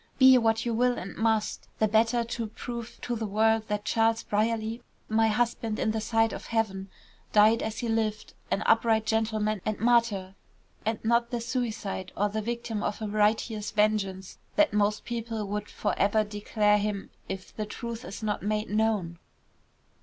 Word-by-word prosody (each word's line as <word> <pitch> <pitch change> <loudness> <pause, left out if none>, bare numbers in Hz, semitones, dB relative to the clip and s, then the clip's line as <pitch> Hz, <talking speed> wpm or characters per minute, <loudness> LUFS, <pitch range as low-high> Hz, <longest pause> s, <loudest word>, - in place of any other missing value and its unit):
Be 260 -1 +8
what 225 0 +1
you 235 - 0
will 245 +2 +2
and 190 - -6
must, 220 -1 0
the 220 - +3
better 225 +3 +3
to 230 -1 -4
prove 235 +2 -7
to 240 - -2
the 220 -1 -3
world 220 +2 +2
that 210 0 -2
Charles 225 0 +2
Brierly, 220 +2 -1 0.3
my 225 +1 +3
husband 225 0 0
in 220 - +1
the 220 0 -2
sight 225 +1 +2
of - - -7
heaven, 200 -4 -1 0.4
died 215 +2 +6
as 220 0 -3
he 240 - -2
lived, 220 -1 -1 0.2
an 205 - 0
upright 225 -1 +3
gentleman 215 -2 0
and 215 -1 -2
martyr, 230 -5 +2 0.5
and 220 0 +1
not 235 +1 +3
the 240 - -2
suicide 225 -6 -3
or 205 +1 +2
the 215 +1 -2
victim 235 -1 -3
of 205 - -2
a 215 - -3
righteous 210 +1 +1
vengeance 205 -3 0 0.2
that 310 -7 +4
most 210 0 +1
people 225 -2 -3
would 210 +1 -4
for - - -2
ever 210 +2 +3
declare 210 0 +1
him 205 -1 -3 0.2
if 190 -1 -6
the 215 -1 -3
truth 235 +1 -6
is 205 - -8
not 210 -2 -1
made 210 +1 -1
known." 210 -6 0
220 Hz, 175 wpm, -28 LUFS, 210-230 Hz, 0.5 s, Be